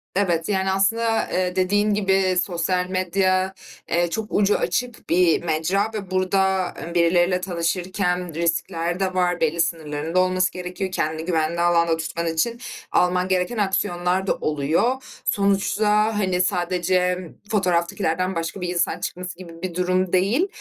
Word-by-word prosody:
Evet, 175 -3 +1
yani 190 -1 +1
aslında, 225 +4 +1
eee, 180 0 0
dediğin 205 +3 +2
gibi 190 -2 +2
sosyal 180 0 -1
medya, 185 +1 +1 0.4
eee, 175 0 +1
çok 220 +4 -3
ucu 205 0 +3
açık 245 -2 -3
bir 175 -1 +3
mecra 180 +7 0
ve 195 -3 -6
burada, 190 0 +1
eee, 170 +1 -6
birileriyle 175 +2 +3
tanışırken 180 0 -1
riskler 170 +1 -1
de 190 -1 0
var. 180 -1 0
Belli 165 +1 +2
sınırların 160 0 -3
da - - +5
olması 185 0 +2
gerekiyor. 180 +1 -5
Kendini 160 -2 -2
güvenli 170 -1 0
alanda 170 -1 +3
tutman 165 +1 -3
için 230 +9 -1 0.3
alman 180 0 +2
gereken 185 +4 0
aksiyonlar 185 -1 0
da - - +3
oluyor. 160 - 0 0.2
Sonuçta, 210 +2 +2
hani, 185 -2 +1
sadece 180 0 +1 0.2
m 180 -3 -8 0.2
fotoğraftakilerden 185 -1 0
başka 165 +3 -4
bir 180 - -2
insan 175 -1 0
çıkması 180 -1 -5
gibi 175 -3 -10
bir 180 -2 -4
durum 185 0 0
değil; 215 - +2
185 Hz, 145 wpm, -23 LUFS, 170-195 Hz, 0.4 s, da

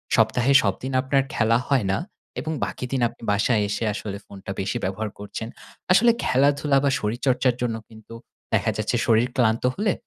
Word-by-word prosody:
সপ্তাহে 115 +4 +3
সবদিন 130 - -2
আপনার 135 +1 +1
খেলা 115 0 +3
হয় 135 -7 +2
না 95 - +1 0.4
এবং 160 - -3
বাকি - - -5
দিন 135 -2 0
আপনি - - -20
বাসায় 105 +2 +2
এসে 105 +2 -2
আসলে 100 -1 -5
ফোনটা 95 -1 -9
বেশি 95 - -2
ব্যবহার 95 +4 -2
করছেন। 105 +2 -6 0.4
আসলে 235 +6 +6
খেলাধুলা 140 +1 +2
বা 140 - +3
শরীরচর্চার 125 +3 +1
জন্য 120 -2 0
কিন্তু 110 +1 -14 0.4
দেখা - - +2
যাচ্ছে 110 +3 -1
শরীর 115 +1 +3
ক্লান্ত 115 -3 +2
হলে. 205 -1 +1
120 Hz, 165 wpm, -24 LUFS, 110-135 Hz, 0.4 s, আসলে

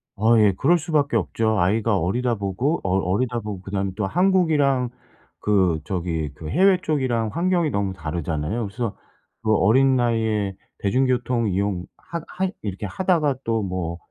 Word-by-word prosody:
어 115 +2 +4
예 105 -2 +5
그럴 170 - +4
수밖에 150 -5 +1
없죠. 110 +1 0
아이가 105 +4 +2
어리다 120 +8 0
보고 110 - -1
어 95 0 +1
어리다 120 +7 0
보고 105 -4 -6
그다음에 95 0 -2
또 105 - 0
한국이랑 155 - +2 0.5
그 95 -6 +2
저기 85 -5 -2
그 75 0 -8
해외 190 +3 +4
쪽이랑 130 -9 0
환경이 175 -2 +1
너무 100 -4 -1
다르잖아요. 80 +4 -3
그래서 115 +1 -4 0.5
그 110 -1 +2
어린 130 +7 +4
나이에 110 -5 0 0.2
대중교통 125 +1 +1
이용 95 -1 -1 0.2
하 170 -1 -5
하 190 +1 -2
이렇게 100 0 -4
하다가 155 - +1
또 115 -1 0
뭐 90 -3 -3
110 Hz, 325 characters per minute, -23 LUFS, 95-135 Hz, 0.5 s, 예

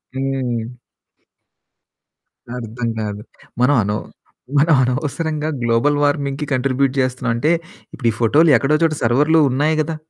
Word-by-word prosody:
హ్మ్. 130 -3 -2 1.9
అర్థం 115 0 -5
కాదు. 105 -1 -5 0.4
మనం 140 +3 +4
అనవ్ 105 +1 -2 0.6
మనం 155 +3 +4
అనవసరంగా 150 +4 -2
గ్లోబల్ 120 +5 +2
వార్మింగ్‌కి 145 0 -1
కాంట్రిబ్యూట్ 130 +1 +1
చేస్తున్నాం. 130 -1 -1
అంటే 150 +8 +1 0.4
ఇప్పుడు 120 - -3
ఈ - - -7
ఫోటోలు 145 +8 +4
ఎక్కడో 140 +5 +1
చోట 160 -1 +2
సర్వర్‌‌లో 145 +7 +3
ఉన్నాయి 145 +5 +1
కదా! 160 +1 -3
135 Hz, 120 wpm, -19 LUFS, 120-150 Hz, 1.9 s, మనం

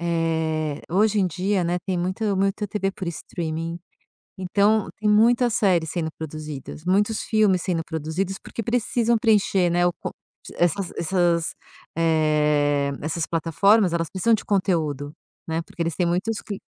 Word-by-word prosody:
eh, 160 -3 -1
hoje 210 +3 +3
em 185 - +3
dia, 185 +2 0
né, 175 +1 0
tem 185 -2 -1
muito 190 +3 -1
muito 195 +2 0
TV 195 -1 -1
por 190 -2 -7
streaming, 165 0 -4 0.6
então, 200 +3 +2
tem 215 0 +1
muitas 235 +2 +4
séries 175 -6 +2
sendo 160 -2 -2
produzidas, 155 0 -7
muitos 205 +4 +1
filmes 210 -5 +2
sendo 170 -3 -1
produzidos 160 +5 -3
porque 230 - -7
precisam 235 0 +1
preencher, 200 -5 +2
né, 175 0 +3
o - - +1
con - - -6 0.5
essas 180 +2 +1
essas, 170 -1 +1 0.4
eh, 150 -3 +2
essas 160 +2 -2
plataformas, 175 +4 +3
elas 165 -2 -1
precisam 220 +5 +3
de - - -8
conteúdo, 155 -8 0 0.4
né, 165 +1 -1
porque 170 - -9
eles 165 -2 -1
têm 180 - +1
muitos 185 +6 -1
cli 200 -2 -6
175 Hz, 150 wpm, -23 LUFS, 160-200 Hz, 0.6 s, muitas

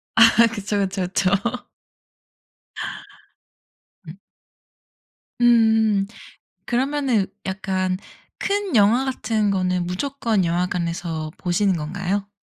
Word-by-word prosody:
아, 230 +1 +7
그쵸 205 -2 -3
그쵸 190 -2 -1
그쵸. 185 0 +1 2.8
음. 160 - -8 1.3
음 220 -4 +4 0.6
그러면은 260 -4 +1 0.2
약간 190 -1 -1 0.4
큰 400 -6 -1
영화 220 +5 +4
같은 220 -5 0
거는 185 -2 0
무조건 225 0 -1
영화관에서 170 -2 -2
보시는 185 +1 +1
건가요? 190 +5 -3
200 Hz, 175 characters per minute, -22 LUFS, 180-230 Hz, 2.8 s, 아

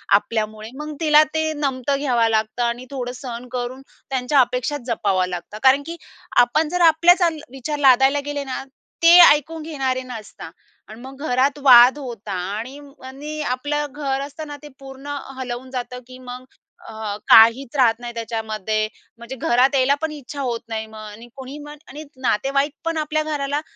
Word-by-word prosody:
आपल्यामुळे 215 +1 -2
मग 300 +1 -6
तिला 305 -1 +6
ते 315 0 0
नमतं 275 -1 -1
घ्यावं 245 -5 +2
लागतं 220 +2 0
आणि 240 +2 -2
थोडं 250 -2 -4
सहन 245 -2 -8
करून 250 +1 -4 0.3
त्यांच्या 265 +1 +1
अपेक्षा 250 +3 +1
जपावं 195 -6 0
लागतात. 180 +4 -7
कारण 270 +2 +5
की 335 +1 -7 0.5
आपण 305 +6 0
जर 360 +1 -1
आपल्याच 345 +4 +5
अल 325 -2 0
विचार 270 +3 -5
लादायला 270 +1 +5
गेले 290 -1 -3
ना, 265 -1 -5 0.4
ते 340 +1 +8
ऐकून 315 +2 +2
घेणारे 270 -5 -2
नसतात 235 -4 -10 0.4
अन् 220 +2 -11
मग 265 +2 -11
घरात 265 +3 +1
वाद 250 +1 +8
होतात 230 -6 -7 0.2
आणि 255 +6 -7 0.3
आणि 295 +4 -7
आपलं 295 +3 -2
घर 275 -2 -3
असतं 290 +2 -7
ना, 290 - -8
ते 295 - -9
पूर्ण 275 +1 -8 0.2
हलवून 255 0 -6
जातं, 250 -1 -5
की 255 0 -12
मग, 250 0 -9 0.5
अ, 220 -2 -5
काहीच 230 +4 +6
राहत 235 -3 +3
नाही 240 0 -7
त्याच्यामध्ये. 220 -2 -3 0.3
म्हणजे 235 +3 -8
घरात 255 +3 +2
यायला 270 +1 +3
पण 320 -1 -2
इच्छा 285 -1 -8
होत 240 -3 -2
नाही 220 -1 -3
मग 220 0 -12
आणि 215 +3 -12
कोणी 265 +2 -9
मग 295 0 -10
आणि 300 +3 -9 0.2
नातेवाईक 275 +4 0
पण 330 -1 -1
आपल्या 310 0 -1
घराला 290 -1 -2
260 Hz, 170 wpm, -21 LUFS, 235-290 Hz, 0.5 s, ते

